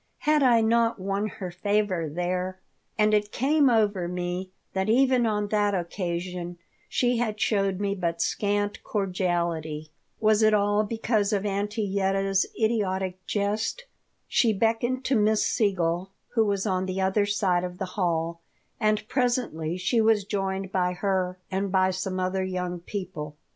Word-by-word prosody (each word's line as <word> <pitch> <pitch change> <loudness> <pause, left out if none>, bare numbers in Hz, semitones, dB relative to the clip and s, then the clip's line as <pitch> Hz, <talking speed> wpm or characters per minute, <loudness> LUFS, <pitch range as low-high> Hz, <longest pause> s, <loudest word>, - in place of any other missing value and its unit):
Had 300 0 +3
I 240 -4 +5
not 230 +1 +2
won 195 +2 -1
her 185 -3 -6
favor 190 -3 0
there? 180 +3 -2 0.4
And 215 0 +3
it 210 0 +2
came 285 +2 +3
over 205 -6 +2
me 180 +1 -3 0.2
that 190 +2 0
even 255 0 +4
on 210 -1 -1
that 205 -1 +2
occasion 175 0 -3 0.3
she 245 -1 +1
had 220 -3 -1
shown 195 -4 +1
me 200 0 -1
but 170 -3 -2
scant 205 0 -1
cordiality. 170 -6 -2 0.3
Was 215 0 +3
it 215 -1 +5
all 205 +1 +2
because 220 -1 0
of 205 -1 0
Auntie 205 +2 -1
Yetta's 195 -1 +1
idiotic 190 -4 0
jest? 215 - -1 0.4
She 230 -3 +3
beckoned 230 +5 0
to 270 - +2
Miss 215 -1 +3
Siegel, 185 -3 0 0.2
who 225 -2 +2
was 200 -1 0
on 185 -2 0
the 185 +1 -2
other 190 +2 +2
side 190 -3 +1
of 180 0 -5
the 190 - -2
hall, 170 -3 -1 0.4
and 215 -1 +1
presently 240 - 0
she 225 +5 +1
was 220 -2 +3
joined 195 -2 -2
by 180 -1 +1
her 185 -1 -1
and 195 +1 -1
by 185 0 +3
some 185 0 -3
other 185 +1 0
young 180 -1 -3
people. 170 -5 -6
195 Hz, 155 wpm, -26 LUFS, 185-215 Hz, 0.4 s, I